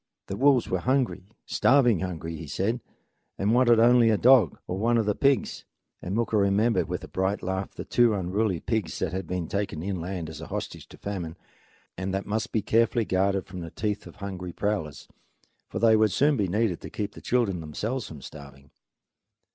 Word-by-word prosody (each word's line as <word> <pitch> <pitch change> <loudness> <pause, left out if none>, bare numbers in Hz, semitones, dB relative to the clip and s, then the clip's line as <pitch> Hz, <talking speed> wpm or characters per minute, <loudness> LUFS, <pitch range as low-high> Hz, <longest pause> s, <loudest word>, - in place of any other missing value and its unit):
The 95 - -5
wolves 135 +2 +4
were 95 - -1
hungry, 125 -4 0 0.2
starving 125 -8 +3
hungry, 85 -2 -4
he 80 0 -8
said, 110 +11 -1 0.6
and 100 +3 +1
wanted 120 -2 +5
only 120 0 +6
a 110 - +3
dog, 120 - +5
or 90 - -4
one 115 +2 +2
of 115 - +1
the 105 - +2
pigs. 140 +4 +1 0.4
And 90 +3 -4
Mooka 115 -1 +1
remembered 100 +1 +2
with 90 - -3
a - - -7
bright 95 +2 -1
laugh 95 +1 -3
the - - -6
two 120 -3 +3
unruly 95 0 0
pigs 110 -6 -2
that - - -2
had 95 -2 -4
been 90 -1 -3
taken 100 -5 -3
inland 90 -2 -4
as 80 0 -8
a 80 - -7
hostage - - -6
to - - -14
famine, 90 -5 -5 0.6
and 95 +1 -2
that 95 - -3
must 110 +2 -2
be 110 - 0
carefully 115 +1 +2
guarded 95 0 +1
from 90 -1 -8
the 85 -1 -6
teeth 105 +3 -3
of - - -13
hungry 95 -3 -6
prowlers, 90 -9 -3 0.6
for - - -5
they 115 -1 +5
would 110 -1 +3
soon 145 +8 +3
be 100 -5 0
needed 100 -1 0
to - - -8
keep 105 -1 -4
the - - -12
children 115 -8 0
themselves 110 - -4
from 75 -4 -10
starving. 70 -2 -12
100 Hz, 195 wpm, -26 LUFS, 90-115 Hz, 0.6 s, only